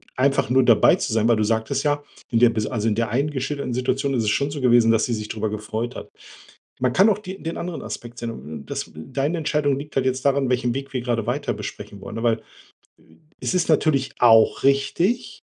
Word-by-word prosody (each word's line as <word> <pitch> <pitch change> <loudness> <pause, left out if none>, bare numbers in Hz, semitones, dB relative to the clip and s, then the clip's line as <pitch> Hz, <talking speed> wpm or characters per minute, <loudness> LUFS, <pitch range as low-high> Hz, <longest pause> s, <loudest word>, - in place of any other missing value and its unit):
einfach 135 -1 +1
nur 130 +1 +5
dabei 115 -3 +5
zu - - -3
sein, 110 0 +2
weil 115 -2 +4
du 110 - +1
sagtest 110 +1 0
ja: 145 0 +1 0.3
„In 115 - +1
der 120 0 +6
bis 110 -1 -2
also, 115 -2 -2
in 105 - +1
der 115 +1 -1
einen 140 +7 0
geschilderten 135 -1 -3
Situation 130 +3 -1
ist 120 -3 +1
es 105 - +1
schon 140 +6 0
so 145 -1 -5
gewesen, 120 -2 +5
dass 115 -1 +2
sie 120 - -2
sich 105 -1 -5
darüber 110 0 -3
gefreut 110 +3 -4
hat“. - - -8 0.7
Man 125 -1 +1
kann 195 - +5
auch 210 -2 +2
die 190 -2 -9
den 165 0 -4
anderen 175 -1 -5
Aspekt 120 0 -8
sehen 115 -1 -4
un 65 - -9 0.2
und - - -15
das - - -4
deine 135 - -2
Entscheidung 150 -3 0
liegt 145 +1 -10
halt 130 -1 +1
jetzt 130 0 -1
daran, 140 -1 +2
welchen 125 -1 0
Weg 135 +1 -5
wir 130 - -2
grade 120 -3 -2
weiter 140 +4 -1
besprechen 100 - -8
wollen. 105 - -8
Ja 115 - -4
weil 115 -2 +3
äh, - - -21 1.0
es - - -2
ist 180 -2 +1
natürlich 145 -3 +2
auch 115 -2 +5
richtig, 170 - +1
125 Hz, 235 wpm, -22 LUFS, 115-140 Hz, 1.0 s, der